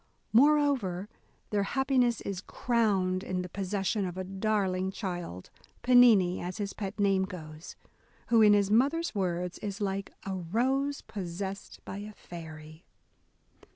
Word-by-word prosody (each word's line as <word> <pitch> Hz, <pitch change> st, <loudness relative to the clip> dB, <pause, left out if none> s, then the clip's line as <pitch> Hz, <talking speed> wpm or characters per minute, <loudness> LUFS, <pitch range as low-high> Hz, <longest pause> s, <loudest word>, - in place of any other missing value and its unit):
Moreover, 255 Hz, -8 st, +3 dB, 0.4 s
their 205 Hz, -1 st, +2 dB
happiness 255 Hz, +1 st, +1 dB
is 195 Hz, -2 st, -4 dB
crowned 195 Hz, -6 st, 0 dB
in 185 Hz, -2 st, -2 dB
the 180 Hz, -, -7 dB
possession 195 Hz, +2 st, -1 dB
of 180 Hz, -1 st, -4 dB
a 185 Hz, -, -2 dB
darling 190 Hz, -1 st, 0 dB
child, 175 Hz, -, -6 dB, 0.3 s
Pennini, 230 Hz, -8 st, +6 dB
as 180 Hz, +3 st, -5 dB
his 200 Hz, -2 st, -3 dB
pet 200 Hz, 0 st, -6 dB
name 195 Hz, -2 st, +3 dB
goes, 155 Hz, -3 st, -9 dB, 0.5 s
who, 230 Hz, -1 st, +5 dB
in 210 Hz, -1 st, +7 dB
his 200 Hz, -1 st, +2 dB
mother's 285 Hz, +9 st, +2 dB
words, 180 Hz, -3 st, -2 dB
is 200 Hz, -1 st, -5 dB
like 195 Hz, -1 st, -2 dB
a 195 Hz, -, -3 dB
rose 255 Hz, +11 st, 0 dB
possessed 195 Hz, 0 st, -6 dB
by 190 Hz, -, -6 dB
a 210 Hz, +1 st, -8 dB
fairy." 155 Hz, -3 st, -10 dB
195 Hz, 135 wpm, -29 LUFS, 185-220 Hz, 0.5 s, in